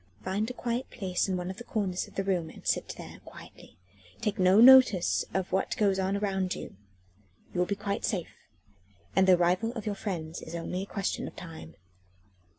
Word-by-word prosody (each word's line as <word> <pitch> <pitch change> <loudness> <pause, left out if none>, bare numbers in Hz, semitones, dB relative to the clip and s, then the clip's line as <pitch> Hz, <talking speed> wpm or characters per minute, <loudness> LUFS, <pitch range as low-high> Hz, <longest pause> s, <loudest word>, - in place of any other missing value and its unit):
Find 205 +4 -1
a - - -5
quiet 245 +1 -3
place 190 -2 -2
in 185 - 0
one 180 +1 -4
of 190 - -10
the 240 - -8
corners 195 -6 -2
of - - -18
the 195 - -1
room 180 -4 -1
and - - -14
sit - - -1
there - - -10
quietly, - - -14 0.4
taking 210 -4 0
no 190 +3 +6
notice 250 -7 +7
of 190 0 -2
what 190 - 0
goes 195 -2 +2
on 190 +1 0
around 190 -2 -1
you. - - -8 0.8
You 180 - -2
will 180 - +2
be 200 - -1
quite 200 0 -3
safe, 180 -6 -2 0.8
and 190 0 +4
the 185 - +8
arrival 180 +6 +1
of 225 -4 -6
your 210 - -1
friends 170 -6 -5
is 165 - -8
only 180 +2 -3
a - - -4
question 200 -2 -2
of - - -10
time." 160 - -10
190 Hz, 200 wpm, -29 LUFS, 180-210 Hz, 0.8 s, the